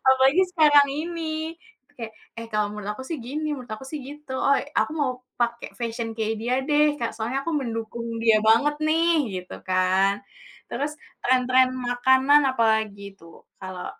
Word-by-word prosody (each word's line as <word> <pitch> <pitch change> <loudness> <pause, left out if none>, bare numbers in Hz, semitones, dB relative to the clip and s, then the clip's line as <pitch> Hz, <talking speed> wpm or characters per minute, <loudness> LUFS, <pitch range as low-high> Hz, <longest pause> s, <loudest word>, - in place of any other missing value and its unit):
Apalagi 265 +7 +5
sekarang 300 -5 +6
itu 320 0 -4 0.4
kek, 225 -1 -6 0.3
"Eh 230 - -6
kalau 210 -1 +1
menurut 210 -1 -5
aku 260 - -8
sih 330 - -4
gini, 305 +4 -3
menurut 250 -4 -10
aku 215 +5 -6
sih 305 - -4
gitu. 295 -1 -10 0.2
Oi 280 - +3 0.2
aku - - +1
mau 275 -3 +2 0.3
pake 235 0 -1
fashion 230 0 -3
kayak 220 0 -1
dia 245 +2 0
deh 300 0 +4
Kak, 230 - -2
soalnya 235 +4 -2
aku 335 - -1
mendukung 230 -1 -5 0.2
dia 225 -1 +5
banget 285 +7 +4
nih," 330 +2 +3 0.3
gitu 180 - -9
kan. 185 +1 +3 0.6
Terus 290 +4 -3 0.3
tren-tren 255 0 +4 0.2
makanan 260 +4 +4
apalagi 220 -4 +1 0.2
tuh, 165 0 -15 0.3
kalau 185 -1 -6
255 Hz, 160 wpm, -24 LUFS, 225-295 Hz, 0.6 s, sekarang